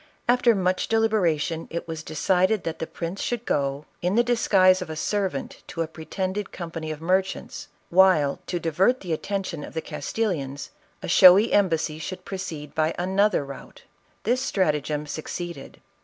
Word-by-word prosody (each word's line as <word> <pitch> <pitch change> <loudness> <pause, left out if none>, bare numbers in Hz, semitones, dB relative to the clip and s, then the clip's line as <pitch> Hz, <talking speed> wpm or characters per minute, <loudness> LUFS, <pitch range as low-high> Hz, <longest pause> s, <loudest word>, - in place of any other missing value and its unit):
After 245 -1 +4
much 185 -1 0
deliberation 180 -8 +1
it 170 - -5
was 160 -1 -5
decided 185 +6 +1
that 165 -1 -4
the 165 - -3
prince 170 +3 -5
should 240 -1 -2
go, 140 0 -1 0.2
in 180 +3 0
the 240 - +5
disguise 195 -6 +4
of 180 - -5
a 155 - -4
servant 190 -3 -2
to 165 - -2
a - - -5
pretended 185 +5 -4
company 165 -2 -6
of 155 0 -6
merchants, 190 +2 -1 0.2
while, 175 -6 +4
to 175 - -2
divert 180 - +2
the 175 -4 -3
attention 185 -2 -3
of - - -10
the - - 0
Castillians, 150 -14 -3 0.3
a - - -4
showy 190 +3 +7
embassy 165 -6 +1
should 180 +3 -6
proceed 170 -7 -6
by 155 +1 0
another 190 -2 +2
route. 140 -1 -11 0.4
This 245 +4 +1
stratagem 150 - 0
succeeded. 160 0 -6
180 Hz, 155 wpm, -25 LUFS, 155-195 Hz, 0.4 s, showy